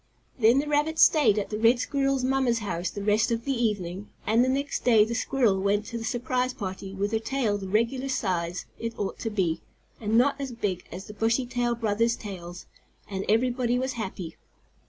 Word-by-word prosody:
Then 230 +2 +5
the 290 +2 +1
rabbit 300 +2 +1
stayed 260 -13 +5
at 205 - -2
the 210 - -2
red 230 +2 +5
squirrel's 275 +1 0
mamma's 260 -2 +2
house 185 -5 -2
the 205 - -6
rest 210 +2 +3
of 230 0 -2
the 275 - 0
evening, 205 -5 -2 0.2
and 225 +3 +4
the 255 - +1
next 280 +2 -1
day 225 -4 +6
the 230 - -4
squirrel 235 -5 +1
went 205 +2 +1
to 235 - -5
the - - -6
surprise 250 +2 -1
party 190 -2 -5
with 200 +2 -1
her 220 - +1
tail 225 -3 -1
the 195 - -6
regular 235 +7 0
size 180 -7 -1
it 230 0 -4
ought 200 - -3
to 225 - -2
be, 180 -6 0 0.4
and 220 0 +1
not 275 +3 +3
as 265 -3 -4
big 205 -6 -3
as 185 +3 -7
the 210 - -9
Bushytail 240 +2 0
brothers' 230 +1 +1
tails, 180 -4 -8 0.4
and 195 -1 -4
everybody 245 +2 +2
was 260 +1 -1
happy. 190 -7 -5
225 Hz, 200 wpm, -27 LUFS, 205-255 Hz, 0.4 s, day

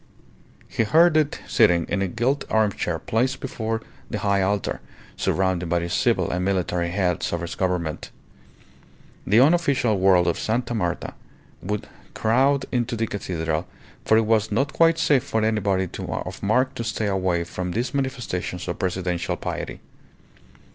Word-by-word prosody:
He - - -1
heard 160 +9 +5
it 155 -2 +1
sitting 85 -1 +4
in 100 - -1
a 100 - +1
gilt 125 +9 0
armchair 105 -6 +1
placed 125 - -1
before 115 -3 -3 0.3
the - - -2
high 100 -1 +1
altar, 100 +1 -1 0.3
surrounded 95 -2 0
by 85 - +2
the 85 0 -3
civil - - +1
and 90 +1 -1
military 90 -2 0
heads 90 -2 0
of 85 - -2
his 85 - -4
Government. 90 -4 -2 1.2
The 105 +3 +5
unofficial 135 - +3
world 95 -2 +5
of 85 - 0
Sta. 120 +2 -1
Marta 90 -6 -2 0.5
would 105 +3 -3 0.3
crowd 135 +5 +2
into 120 -1 0
the 115 0 0
cathedral, 85 -5 -3 0.4
for 110 - +4
it 110 - +3
was 110 -1 +2
not 135 +7 0
quite 165 0 +4
safe 140 -6 +3
for 110 -5 -1
anybody 100 -4 +1
of - - -5
mark 125 +6 +2
to 115 - -4
stay 110 -1 -2
away 95 -3 0
from 90 +1 -5
these 115 +8 -2
manifestations 120 -10 -3
of 90 - -4
presidential 90 -2 -1
piety. - - -5
105 Hz, 155 wpm, -24 LUFS, 90-120 Hz, 1.2 s, heard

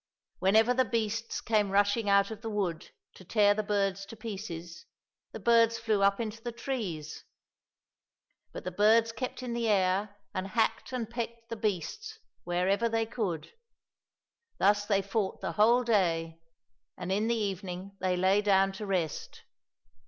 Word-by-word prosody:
Whenever 220 +6 +4
the 260 +1 +3
beasts 225 -1 -2
came 210 -3 +1
rushing 205 +2 +2
out 200 +1 +4
of 220 -1 -7
the 225 - -4
wood 195 -6 -2 0.2
to - - -14
tear 205 +2 +4
the 215 - -1
birds 195 -2 0
to 225 - -9
pieces, 190 -6 -7 0.4
the - - -7
birds 230 -1 +4
flew 220 -3 0
up 200 +1 +3
into 225 0 -4
the 240 0 -4
trees; 220 - -5 1.3
but - - -8
the 185 - -4
birds 220 +4 +4
kept 255 +2 -5
in 245 -2 -3
the 235 -1 -1
air, 200 0 +1 0.2
and 185 +1 -3
hacked 225 +6 0
and 235 -3 -4
pecked 235 -1 -5
the 230 - -3
beasts 225 - -3 0.3
wherever 190 +6 +1
they 225 0 0
could. 205 -9 -3 1.1
Thus 205 +1 +3
they 200 -2 +2
fought 195 0 -2
the - - -3
whole 235 +4 +4
day, 165 -7 +1 0.6
and 180 0 -4
in 210 +3 +1
the 235 - +2
evening 195 -2 -4
they 185 -1 0
lay 190 +3 +3
down 195 -1 +3
to 200 +2 -7
rest. 175 -6 -3
205 Hz, 160 wpm, -30 LUFS, 190-230 Hz, 1.3 s, Whenever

